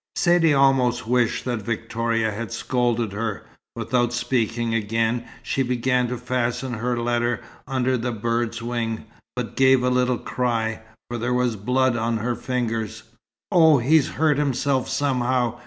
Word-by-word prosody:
Saidee 175 -2 +4
almost 125 -3 +3
wished 120 -1 +1
that 120 -3 -2
Victoria 115 +1 -1
had 110 +2 -5
scolded 120 -3 0
her. 105 0 -4 0.3
Without 120 -1 0
speaking 120 -1 -1
again, 115 +2 0 0.2
she 135 - -1
began 125 0 +1
to 125 +1 -3
fasten 125 +1 -2
her 120 +2 -1
letter 120 0 0 0.3
under 130 -1 +1
the 120 +2 -2
bird's 115 +1 -2
wing, 115 -2 -3 0.3
but 125 -2 -4
gave 130 -1 +4
a 125 - +2
little 125 0 +2
cry, 115 -3 -2 0.3
for 120 0 -4
there 120 +2 0
was 125 -2 +1
blood 125 +4 +1
on 115 0 0
her 120 +3 -1
fingers. 115 -3 -3 0.5
"Oh, 160 -4 +6
he's 140 +4 +3
hurt 150 -1 +3
himself 135 -1 0
somehow!" 125 -3 0
120 Hz, 145 wpm, -23 LUFS, 115-130 Hz, 0.5 s, Oh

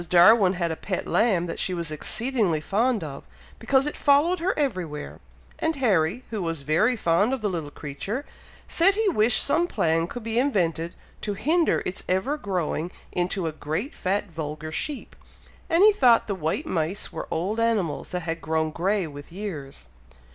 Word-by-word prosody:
Darwin 185 +2 +6
had 170 -3 -1
a - - -2
pet 185 +3 -4
lamb 200 -6 +2
that 170 - -5
she 185 - 0
was 170 -2 -3
exceedingly 210 - 0
fond 215 +6 +1
of, 140 -3 -7 0.4
because 270 0 +2
it 295 - -2
followed 295 +6 +3
her 365 +3 0
everywhere, 185 - -3 0.4
and 320 0 0
Harry, 215 - +1
who 215 -3 -2
was 165 -4 -3
very 190 - +2
fond 200 +4 +2
of 265 - -2
the 210 - 0
little 160 -5 -4
creature, 195 - -5 0.4
said 385 +4 +3
he 440 -1 +2
wished 225 - +3
some 340 +5 +2
plan 165 - +1
could 245 +5 -7
be 225 +1 0
invented 170 - 0 0.3
to 205 -1 -3
hinder 325 - +2
its 180 - -4
ever 190 +11 +1
growing 180 - -2 0.2
into 180 0 -1
a 160 - -1
great 155 - -4
fat 195 +3 -1
vulgar 155 -1 -5
sheep; 285 - -4 0.5
and 335 +3 +4
he 425 0 +8
thought 245 - +5
the 205 - -2
white 180 - -2
mice 175 - -2
were - - -5
old 190 +7 -1
animals 210 -10 0
that 180 - -3
had 165 0 -4
grown 160 +1 0
grey 190 +4 0
with 145 0 -10
years. 160 - -6
190 Hz, 175 wpm, -25 LUFS, 165-245 Hz, 0.5 s, he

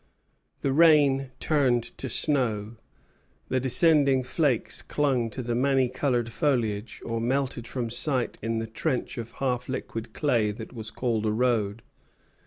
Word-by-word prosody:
The 135 - 0
rain 145 -4 +5
turned 130 -6 +2 0.2
to 130 - -4
snow; 115 -5 0 0.7
the 130 - +1
descending 135 0 +4
flakes 130 -2 0
clung 130 -6 0
to 125 +4 -6
the 120 0 -2
many 130 +1 +2
colored 125 -3 -1
foliage, 115 -4 -1
or 115 -1 -2
melted 125 -1 -1
from 120 -2 -3
sight 130 +1 -1
in 115 +1 -1
the 115 - -2
trench 115 +3 -2
of 115 0 -7
half 125 -2 -2
liquid 115 -3 -5
clay 120 -8 +1
that 110 +3 -9
was 110 -3 -6
called 110 -1 -1
a - - +2
road. 110 -2 0
125 Hz, 145 wpm, -26 LUFS, 115-135 Hz, 0.7 s, rain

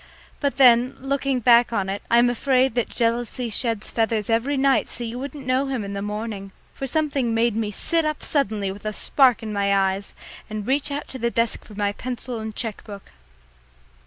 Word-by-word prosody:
But 280 -4 -1
then, 250 -1 +5
looking 270 -1 -1
back 235 +1 +5
on 200 -4 -1
it, 200 +1 -3
I 235 - +5
am 240 +1 +6
afraid 260 +1 +2
that 240 -1 0
jealousy 235 0 -1
sheds 225 -2 -2
feathers 225 -1 0
every 250 +6 +1
night 270 0 +2
so 240 - -4
you 235 +1 -5
won't 280 +2 -6
know 265 -1 0
him 260 -5 -2
in 200 0 -5
the 200 - -3
morning, 210 -1 -5 0.2
for 270 - -5
something 280 -5 0
made 230 -1 +2
me 220 -2 -1
sit 330 - 0
up 305 -1 -2
suddenly 215 -9 0
with 200 +1 -10
a 215 - -2
spark 250 -1 +3
in 215 -1 -4
my 200 -1 +1 0.2
eyes 195 +1 -6 0.3
and 215 -1 -5
reach 275 +4 0
out 285 +1 -4
to 260 - -7
the 235 0 +1
desk 230 0 0
for 210 - -13
my 205 0 0
pencil 245 +1 -5
and 220 -1 -6
cheque 225 -4 -4
book. 200 -2 -11
235 Hz, 205 wpm, -23 LUFS, 215-265 Hz, 0.3 s, am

